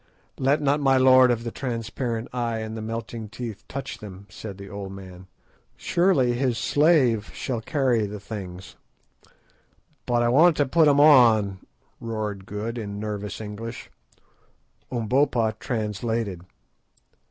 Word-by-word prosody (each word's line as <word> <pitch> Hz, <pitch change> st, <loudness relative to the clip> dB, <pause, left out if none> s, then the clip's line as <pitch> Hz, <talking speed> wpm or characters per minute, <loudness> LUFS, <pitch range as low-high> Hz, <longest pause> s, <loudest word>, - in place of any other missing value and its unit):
"Let 140 Hz, +3 st, +2 dB
not 145 Hz, +1 st, +2 dB
my 135 Hz, -2 st, +3 dB
lord 130 Hz, -1 st, +6 dB
of 115 Hz, -1 st, 0 dB
the 115 Hz, -, -4 dB
transparent 115 Hz, -1 st, -4 dB
Eye 120 Hz, -2 st, -1 dB
and 110 Hz, 0 st, -5 dB
the 110 Hz, -, -5 dB
melting 115 Hz, 0 st, -5 dB
Teeth 115 Hz, -1 st, -7 dB
touch 135 Hz, 0 st, -6 dB
them," 100 Hz, -2 st, -10 dB
said 100 Hz, 0 st, -8 dB
the 100 Hz, 0 st, -9 dB
old 100 Hz, -1 st, -7 dB
man. 95 Hz, -1 st, -11 dB, 0.5 s
"Surely 165 Hz, -9 st, +2 dB
his 125 Hz, -1 st, 0 dB
slave 135 Hz, -10 st, +3 dB
shall 120 Hz, -4 st, -3 dB
carry 125 Hz, -5 st, +1 dB
the 105 Hz, +1 st, -7 dB
things." 95 Hz, -3 st, -8 dB, 1.3 s
"But 120 Hz, -1 st, +2 dB
I -, -, +2 dB
want 155 Hz, +6 st, +5 dB
to 145 Hz, -, +3 dB
put 160 Hz, +4 st, +4 dB
'em 145 Hz, -1 st, +4 dB
on!" 115 Hz, -10 st, +6 dB, 0.4 s
roared 105 Hz, -4 st, -4 dB
Good, 110 Hz, +4 st, -4 dB
in 100 Hz, -2 st, -5 dB
nervous 105 Hz, -1 st, -5 dB
English. 110 Hz, +2 st, -7 dB, 1.0 s
Umbopa 120 Hz, -1 st, +1 dB
translated. 110 Hz, -4 st, -3 dB
115 Hz, 135 wpm, -25 LUFS, 105-130 Hz, 1.3 s, lord